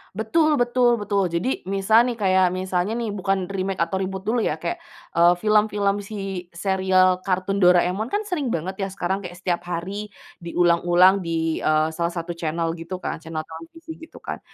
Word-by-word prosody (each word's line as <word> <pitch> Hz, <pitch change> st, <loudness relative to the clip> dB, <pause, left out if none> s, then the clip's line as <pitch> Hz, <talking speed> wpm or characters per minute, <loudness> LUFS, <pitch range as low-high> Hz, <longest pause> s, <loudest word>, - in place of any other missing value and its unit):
Betul 305 Hz, +8 st, +2 dB
betul 245 Hz, -1 st, +3 dB
betul. 200 Hz, -3 st, 0 dB
Jadi 175 Hz, +6 st, -2 dB
misal, 215 Hz, +5 st, +3 dB
nih, 240 Hz, -, -2 dB
kayak 190 Hz, -2 st, +3 dB
misalnya, 185 Hz, +3 st, -1 dB
nih, 230 Hz, -3 st, -2 dB
bukan 195 Hz, -2 st, -1 dB
remake 190 Hz, -1 st, -2 dB
atau 190 Hz, +3 st, -2 dB
reboot 190 Hz, 0 st, -4 dB
dulu, 230 Hz, +3 st, 0 dB
ya. 150 Hz, -, 0 dB
Kayak, 170 Hz, -, -3 dB, 0.4 s
eee, 170 Hz, +1 st, +6 dB
film-film 210 Hz, -1 st, +2 dB
si 195 Hz, -3 st, -6 dB
serial 185 Hz, -1 st, +2 dB
kartun 190 Hz, +1 st, 0 dB
Doraemon, 180 Hz, +4 st, +3 dB
kan, 415 Hz, +9 st, -1 dB
sering 350 Hz, -10 st, -2 dB
banget, 190 Hz, 0 st, -3 dB
ya, 195 Hz, -, -1 dB
sekarang 190 Hz, 0 st, -2 dB
kaya 175 Hz, 0 st, -8 dB
setiap 175 Hz, -1 st, -2 dB
hari 190 Hz, +5 st, -4 dB, 0.3 s
diulang-ulang 175 Hz, +2 st, +3 dB
di, 165 Hz, -2 st, -1 dB
eee, 155 Hz, 0 st, +2 dB
salah 170 Hz, +1 st, -2 dB
satu 170 Hz, 0 st, -4 dB
channel 165 Hz, 0 st, -1 dB
gitu, 180 Hz, +3 st, -7 dB
kan. 165 Hz, -, -3 dB
Channel 160 Hz, -1 st, -5 dB
televisi 165 Hz, -, -11 dB
gitu, 320 Hz, -, -13 dB
kan. -, -, -5 dB
190 Hz, 175 wpm, -23 LUFS, 175-210 Hz, 0.4 s, eee